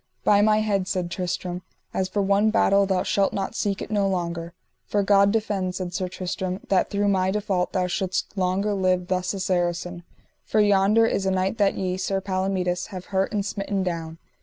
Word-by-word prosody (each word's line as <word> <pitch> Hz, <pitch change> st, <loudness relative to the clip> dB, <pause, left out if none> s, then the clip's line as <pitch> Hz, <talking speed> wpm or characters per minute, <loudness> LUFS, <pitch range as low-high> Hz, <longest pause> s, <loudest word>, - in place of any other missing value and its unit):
By 205 Hz, -1 st, +5 dB
my 215 Hz, 0 st, +4 dB
head, 200 Hz, -3 st, 0 dB
said 180 Hz, -2 st, -2 dB
Tristram, 180 Hz, 0 st, -3 dB, 0.3 s
as 190 Hz, 0 st, -1 dB
for 205 Hz, +1 st, 0 dB
one 200 Hz, +2 st, +3 dB
battle 200 Hz, -2 st, +3 dB
thou 190 Hz, -2 st, +1 dB
shalt 195 Hz, -1 st, +1 dB
not 195 Hz, -1 st, -2 dB
seek 200 Hz, -2 st, -1 dB
it -, -, -9 dB
no 205 Hz, -2 st, +2 dB
longer. 170 Hz, -2 st, -3 dB, 0.3 s
For 205 Hz, -1 st, +1 dB
God 200 Hz, 0 st, +5 dB
defend, 200 Hz, -4 st, -1 dB
said 180 Hz, -2 st, -4 dB
Sir 185 Hz, 0 st, -2 dB
Tristram, 185 Hz, 0 st, -4 dB
that 190 Hz, -2 st, +2 dB
through 205 Hz, 0 st, 0 dB
my 190 Hz, -2 st, +2 dB
default 195 Hz, -3 st, -1 dB
thou 185 Hz, -1 st, 0 dB
shouldst 185 Hz, +2 st, -2 dB
longer 190 Hz, +2 st, 0 dB
live 185 Hz, -2 st, 0 dB
thus 180 Hz, -1 st, 0 dB
a -, -, -4 dB
Saracen, 175 Hz, -1 st, -1 dB, 0.4 s
for 215 Hz, -, 0 dB
yonder 205 Hz, +2 st, +4 dB
is 195 Hz, -3 st, 0 dB
a -, -, +3 dB
knight 190 Hz, +4 st, 0 dB
that 200 Hz, -1 st, +3 dB
ye, 185 Hz, -1 st, -1 dB
Sir 195 Hz, +1 st, -1 dB
Palomides, 185 Hz, -2 st, -1 dB
have 185 Hz, -2 st, -8 dB
hurt 190 Hz, 0 st, +1 dB
and 205 Hz, -2 st, -1 dB
smitten 200 Hz, -1 st, -2 dB
down. 165 Hz, -3 st, -4 dB
190 Hz, 195 wpm, -24 LUFS, 180-200 Hz, 0.4 s, By